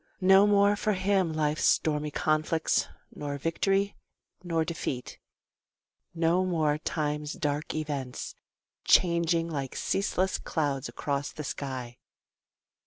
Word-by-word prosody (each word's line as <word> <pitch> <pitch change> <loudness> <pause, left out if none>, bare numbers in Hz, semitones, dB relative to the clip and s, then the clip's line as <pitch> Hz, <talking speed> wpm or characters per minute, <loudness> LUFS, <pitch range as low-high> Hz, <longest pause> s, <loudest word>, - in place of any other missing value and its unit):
No 190 +1 +6
more 205 0 +4
for 210 +1 0
him 190 -2 +1
life's 155 -1 0
stormy 150 -1 +2
conflicts, 155 +2 +1 0.3
Nor 145 -1 -4
victory, 195 +6 0 0.5
nor 165 -2 0
defeat 145 -7 -4 1.0
no 170 +2 +2
more 155 -5 +1
time's 150 -1 -2
dark 150 0 -2
events, 145 -5 -4 0.5
Charging 170 -1 +3
like 140 -5 -4
ceaseless 190 -1 0
clouds 145 -4 -2
across 140 -1 -3
the 155 - -7
sky. 130 -4 -5
160 Hz, 105 wpm, -28 LUFS, 145-180 Hz, 1.0 s, No